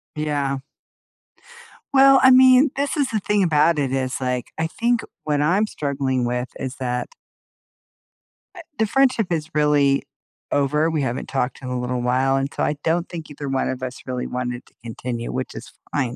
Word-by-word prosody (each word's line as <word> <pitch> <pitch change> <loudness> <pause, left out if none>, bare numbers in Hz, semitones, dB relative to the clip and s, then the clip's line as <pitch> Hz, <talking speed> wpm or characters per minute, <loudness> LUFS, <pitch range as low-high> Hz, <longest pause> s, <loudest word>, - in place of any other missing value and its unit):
Yeah. 145 -3 -1 1.3
Well, 270 0 +7
I 260 - +8
mean, 260 +2 +7
this 280 +2 -1
is 280 -3 +1
the 215 - 0
thing 205 0 +1
about 155 -1 +3
it 135 -3 -1
is, 130 -1 -1
like, 125 -1 -2
I 160 - 0
think 235 +7 0 0.2
what 150 -1 0
I'm 180 +8 +3
struggling 135 - -1
with 125 +1 -2
is 130 0 -4
that 125 -2 -3 1.5
eh, 350 - -8 0.2
the 220 - +2
friendship 255 -4 +2
is 160 -2 -1
really 145 -2 +3 0.5
over, 150 +3 +2
we 160 -2 -1
haven't 130 -1 -3
talked 130 -2 -2
in 125 - -7
a 125 0 -2
little 125 0 -2
while, 130 +2 +2
and 135 +1 -1
so - - -2
I 150 - 0
don't 170 +2 0
think 165 -3 -7
either 145 -1 -6
one 135 0 0
of 130 0 -4
us 130 0 -5
really 125 -1 -3
wanted 125 0 -4
to - - -24
continue, 120 0 -5
which 130 0 -4
is - - -9 0.2
fine, 125 -4 -1
140 Hz, 180 wpm, -22 LUFS, 130-170 Hz, 1.5 s, I